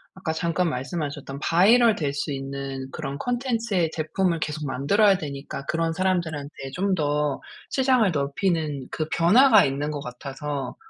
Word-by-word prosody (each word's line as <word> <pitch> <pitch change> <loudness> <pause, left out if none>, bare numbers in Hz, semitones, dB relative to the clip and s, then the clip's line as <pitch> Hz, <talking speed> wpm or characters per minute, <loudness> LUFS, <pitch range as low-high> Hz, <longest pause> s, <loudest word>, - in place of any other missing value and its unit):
아까 185 -4 -3
잠깐 170 +2 0
말씀하셨던 140 0 -4
바이럴 220 +8 +5
될 145 -6 -2
수 145 +1 -3
있는 135 -1 -5
그런 140 -2 -5
콘텐츠의 230 - -1
제품을 165 +2 -1
계속 155 0 -3
만들어야 195 +10 +3
되니까 140 -3 -6
그런 165 +1 0
사람들한테 160 -6 -2
좀 190 +3 0
더 150 -2 0 0.3
시장을 255 -6 +3
넓히는 145 -1 -1
그 155 - -2
변화가 215 +7 +6
있는 140 +2 -2
것 150 - -4
같아서 135 +1 -5
155 Hz, 325 characters per minute, -24 LUFS, 140-190 Hz, 0.3 s, 변화가